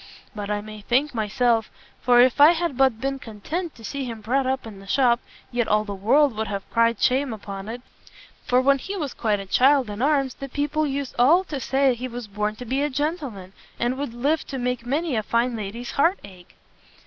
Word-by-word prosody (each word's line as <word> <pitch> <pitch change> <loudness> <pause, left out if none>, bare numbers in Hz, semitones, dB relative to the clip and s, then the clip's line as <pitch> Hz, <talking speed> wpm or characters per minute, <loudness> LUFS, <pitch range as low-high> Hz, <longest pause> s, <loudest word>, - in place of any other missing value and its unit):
But 205 -1 -5
I 205 0 -1
may 215 0 -10
thank 260 +7 +1
myself, 225 +1 +1 0.3
for 245 -1 +5
if 255 +3 +3
I 305 +4 +9
had 340 -4 -2
but 260 -3 +3
been 270 +2 -2
content 300 - -5
to 230 - -15
see 280 +5 -4
him 230 -3 -5
brought 255 +5 0
up 265 -1 -1
in 210 -3 -9
the 195 - -14
shop 240 0 +3 0.3
yet 240 -2 0
all 210 0 +2
the 205 - -5
world 245 +7 +3
would 220 0 -2
have 200 -1 -5
cried 230 -1 +2
shame 265 +1 +2
upon 200 -1 -7
it, 245 +2 -7 0.6
for 250 - +3
when 275 +1 +3
he 395 +8 -5
was 290 -7 -3
quite 215 -3 0
a 195 - -6
child 260 +3 +3
in 205 +2 -6
arms, 275 -2 +2
the 275 - -8
people 295 +3 -1
used 275 -1 -3
all 320 +10 +5
to 300 -6 -5
say 270 0 +2
he 245 +2 -5
was 240 -2 -7
born 210 +1 -2
to 245 - -9
be 265 +4 -1
a 295 - +1
gentleman, 280 - -3 0.3
and 240 +2 0
would 270 -4 -5
live 290 +6 0
to 270 - -5
make 250 -1 -2
many 295 +2 0
a 220 - +1
fine 235 +3 0
lady's 225 +3 -5
heart 335 +7 +2
ache." 185 -3 -14
245 Hz, 220 wpm, -24 LUFS, 220-275 Hz, 0.6 s, I